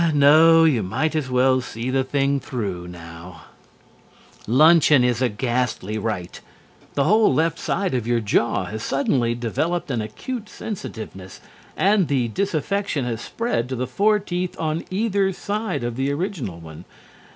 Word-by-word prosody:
No, 160 +3 +6
you 145 -8 +3
might 125 +12 -1
as 150 -4 -1
well 130 +1 +3
see 120 +1 -5
the 135 0 +1
thing 140 +1 0
through 100 -10 -5
now. 85 0 -11 1.0
Luncheon 150 +2 +5
is 125 0 +1
a 125 - +2
ghastly 120 -2 -2
rite. 100 -5 -4 0.5
The 140 - +2
whole 215 +8 +4
left 160 +4 +1
side 195 -5 -1
of 120 -3 -1
your 120 -1 +2
jaw 110 -1 +1
has 110 +4 -6
suddenly 125 -3 0
developed 140 - -2
an 120 -3 -1
acute 210 - -6
sensitiveness 110 - -8 0.4
and 195 -3 +3
the 130 -4 0
disaffection 195 - -1
has 120 -2 -3
spread 130 - -2
to 130 - -2
the 125 +1 -2
four 205 - +2
teeth 180 -3 -4
on 160 0 -2
either 200 -1 +1
side 210 - -3
of 120 -1 -3
the 135 +1 0
original 145 - -4
one. 80 +1 -11
130 Hz, 150 wpm, -22 LUFS, 115-170 Hz, 1.0 s, No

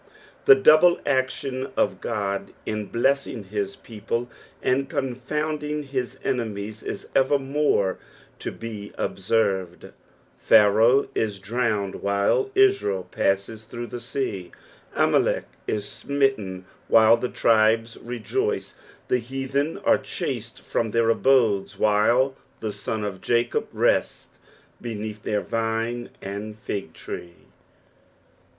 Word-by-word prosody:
The 415 - +10
double 175 - +6
action 130 -1 -1
of - - +1
God 100 -1 -3
in 105 -1 -3
blessing 130 -1 0
his 100 0 -3
people 115 +1 -4 0.3
and 135 +1 +1
confonnding 150 +4 -2
his 130 -2 -4
enemies 110 -3 -3
is - - -6
evermore 135 -7 +2 0.4
to - - -4
be 110 -3 -8
observed; 95 -3 -1 0.5
Pharaoh 110 +5 +5
is 105 -3 -1
drowned, 105 -1 -1
while 100 - +1
Israel 390 - +3
passes 100 +3 -1
through 120 +2 -6
the 120 +1 -7
sea; 120 -7 -3 0.4
Amalek - - +2 0.2
is 105 -1 -2
smitten, 115 -7 -1 0.2
while 110 0 +7
the 125 +1 -3
tribes 115 0 +3
rejoice; 395 - -2 0.3
the 125 - +2
heathen 135 +5 -2
are - - +5
chased - - -5
from 115 - -1
their 115 +1 +3
abodes, 115 -6 +2
while 115 +6 +3 0.2
the 110 -2 -3
sons 110 0 -3
of 95 -2 -5
Jacob 120 0 +1
rest - - +1 0.5
beneath 110 -2 -5
their 105 -1 -1
vine 115 +1 -2
and 105 +2 -6
fig 100 -2 -5
tree. 85 0 -8
115 Hz, 110 wpm, -24 LUFS, 105-135 Hz, 0.5 s, The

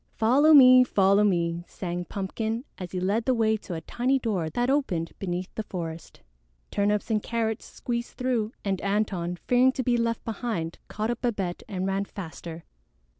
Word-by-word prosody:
"Follow 270 +8 +4
me! 255 -3 +9
Follow 200 -3 +3
me!" 170 -3 +1
sang 175 -1 -4
Pumpkin, 220 +6 -3
as 180 -2 -6
he 185 - -2
led 205 +5 0
the 260 - +2
way 220 -1 +2
to 185 -4 -7
a 160 - -5
tiny 250 - 0
door 205 -10 -1
that 240 +10 0
opened 225 - 0
beneath 180 -1 -4
the - - -3
forest. 165 -5 -7 0.5
Turnips 210 +2 0
and 215 -1 +2
Carrots 225 -1 -2
squeezed 235 0 -5
through, 240 -4 0
and 195 -2 -1
Antone, 195 -4 -1
fearing 250 +1 +5
to 260 - -2
be 245 0 +2
left 230 -1 -1
behind, 215 -7 -3
caught 215 +2 -2
up 240 - -5
Babette 200 -8 -2
and 185 -2 -3
ran 195 +1 0
faster. 170 -3 -8
210 Hz, 175 wpm, -26 LUFS, 180-235 Hz, 0.5 s, me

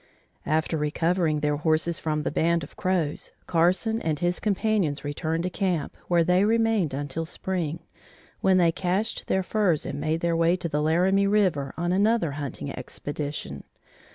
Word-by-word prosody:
After 160 +1 +1
recovering 155 +1 +1
their 150 0 +1
horses 160 +2 +1
from 150 -1 -1
the - - -1
band 170 +2 +1
of 145 - -11
Crows, 175 -5 -1
Carson 185 +7 +2
and 155 -2 -1
his 175 +3 0
companions 200 -8 0
returned 160 +3 -2
to 180 - -2
camp, 180 -5 -1
where 170 -1 +3
they 180 +3 +3
remained 225 -6 +2
until 145 +3 -3
spring, 170 -3 -3 0.6
when 190 -1 +3
they 170 -2 +4
cached 190 +5 -2
their 190 - +1
furs 185 -6 +1
and 140 - -4
made 160 +1 -1
their 170 -1 +1
way 165 +1 +3
to 180 -2 -4
the 150 -2 -1
Laramie 185 +6 +3
River 185 -10 +2
on 175 +1 -1
another 205 -3 +2
hunting 140 - -5
expedition. 145 0 -5
170 Hz, 160 wpm, -26 LUFS, 155-185 Hz, 0.6 s, they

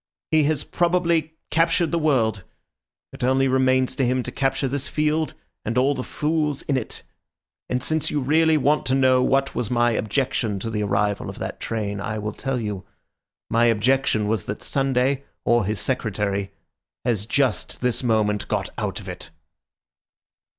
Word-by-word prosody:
He 155 -2 +4
has 150 -1 +1
probably 170 -3 +1 0.2
captured 165 0 +2
the 170 - +1
world; 115 - +1 0.7
it - - -7
only 130 +1 +3
remains 130 0 +2
to 135 - 0
him 125 0 +1
to - - -5
capture 135 0 0
this 140 +1 -1
field 155 +1 0 0.3
and 115 +3 -2
all 135 +3 +3
the 130 - -4
fools 150 -1 -1
in 140 - 0
it. 125 -4 -3 0.7
And 125 0 -1
since 155 -1 +1
you 150 - 0
really 155 +4 +3
want 150 +1 +2
to 130 - +2
know 130 -1 +4
what 135 +1 +1
was 120 -4 -2
my 120 -1 +3
objection 110 -2 -1
to 115 - -3
the 105 -1 -1
arrival 100 0 0
of - - -8
that - - -5
train, 105 -3 -3
I 105 +2 -3
will 105 0 -3
tell 135 +1 -2
you. 105 -4 -4 0.6
My 115 +1 +3
objection 115 -1 +2
was 105 -3 0
that 100 - -5
Sunday 135 0 +1 0.2
or 120 -3 +3
his 105 0 -1
Secretary 100 -4 -1 0.5
has 110 -4 0
just 135 +3 0
this 125 -1 0
moment 110 -4 +1
got - - -2
out - - -2
of - - -11
it." - - -6
130 Hz, 170 wpm, -23 LUFS, 110-140 Hz, 0.7 s, He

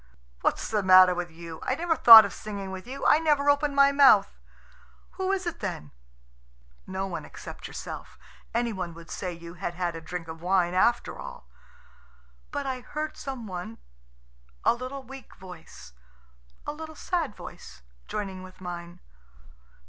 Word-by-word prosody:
"What's - - 0
the 215 -2 0
matter 185 -1 +7
with 175 0 -4
you? 165 0 -10
I 260 - -1
never 330 +2 0
thought 225 -6 +11
of 200 - -5
singing 200 -3 -6
with 190 +3 -8
you. 270 +2 -6
I 300 - +6
never 290 -3 +3
opened 285 0 0
my 280 0 +6
mouth." 270 -8 +5 0.7
"Who 380 0 -2
is 380 -1 -1
it 345 - -4
then?" 175 - -5 1.0
"No 190 +1 -3
one 185 -3 -5
except - - -9
yourself. - - -8 0.3
Any 235 -1 0
one 180 -4 -5
would 165 0 -12
say 185 -2 -4
you 170 0 -10
had 175 -1 -5
had 175 -2 -2
a 165 - -7
drink 165 +1 -6
of 160 0 -9
wine 180 -1 +2
after 235 +6 +1
all." - - -9 1.0
"But 285 -1 -4
I 260 -1 -3
heard 305 +5 -5
some 265 -4 -6
one... 180 - -7 0.9
a - - +5
little 255 +3 -6
weak 265 +1 -12
voice... 180 - -13 0.7
a 295 - -3
little 315 +1 -9
sad 330 - -2
voice... - - -11 0.2
joining 195 -3 -4
with 185 0 -13
mine." 175 -1 -8
200 Hz, 165 wpm, -27 LUFS, 180-275 Hz, 1.0 s, thought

